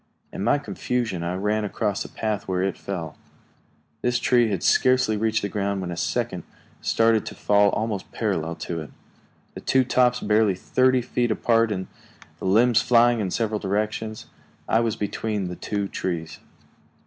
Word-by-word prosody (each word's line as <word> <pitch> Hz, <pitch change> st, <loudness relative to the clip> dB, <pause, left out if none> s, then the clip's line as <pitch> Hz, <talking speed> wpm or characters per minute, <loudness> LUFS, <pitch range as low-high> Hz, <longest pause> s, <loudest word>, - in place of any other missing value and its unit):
In -, -, -4 dB
my -, -, +3 dB
confusion 120 Hz, -8 st, -2 dB
I 85 Hz, +2 st, -2 dB
ran 105 Hz, +3 st, 0 dB
across 105 Hz, 0 st, -2 dB
the -, -, -5 dB
path 110 Hz, -2 st, -3 dB
where 95 Hz, -1 st, 0 dB
it 95 Hz, -1 st, -1 dB
fell. 85 Hz, -6 st, -5 dB, 0.9 s
This 125 Hz, 0 st, +1 dB
tree 120 Hz, -2 st, +3 dB
had 95 Hz, -4 st, -2 dB
scarcely 125 Hz, -4 st, +3 dB
reached 110 Hz, 0 st, 0 dB
the -, -, 0 dB
ground 100 Hz, -1 st, -2 dB
when 90 Hz, -2 st, -4 dB
a -, -, -4 dB
second -, -, -2 dB, 0.4 s
started 115 Hz, -1 st, +3 dB
to -, -, -6 dB
fall 100 Hz, 0 st, +3 dB
almost 105 Hz, -2 st, -3 dB
parallel 85 Hz, -7 st, -2 dB
to 85 Hz, -2 st, -3 dB
it, 75 Hz, -, -9 dB, 0.6 s
the -, -, -8 dB
two 130 Hz, 0 st, +3 dB
tops 125 Hz, -1 st, +2 dB
barely 105 Hz, -3 st, +2 dB
thirty 130 Hz, +6 st, +2 dB
feet 120 Hz, -1 st, 0 dB
apart 115 Hz, 0 st, +2 dB
and 95 Hz, -2 st, -2 dB, 0.5 s
the -, -, -6 dB
limbs 115 Hz, +5 st, +4 dB
flying 120 Hz, 0 st, +4 dB
in 100 Hz, -3 st, -1 dB
several 110 Hz, +1 st, -1 dB
directions. 110 Hz, +2 st, -2 dB, 0.4 s
I 110 Hz, -, +3 dB
was 115 Hz, -2 st, 0 dB
between 105 Hz, -2 st, -2 dB
the 90 Hz, -, -5 dB
two 100 Hz, +1 st, -3 dB
trees. 85 Hz, -4 st, -4 dB
105 Hz, 170 wpm, -24 LUFS, 95-115 Hz, 0.9 s, limbs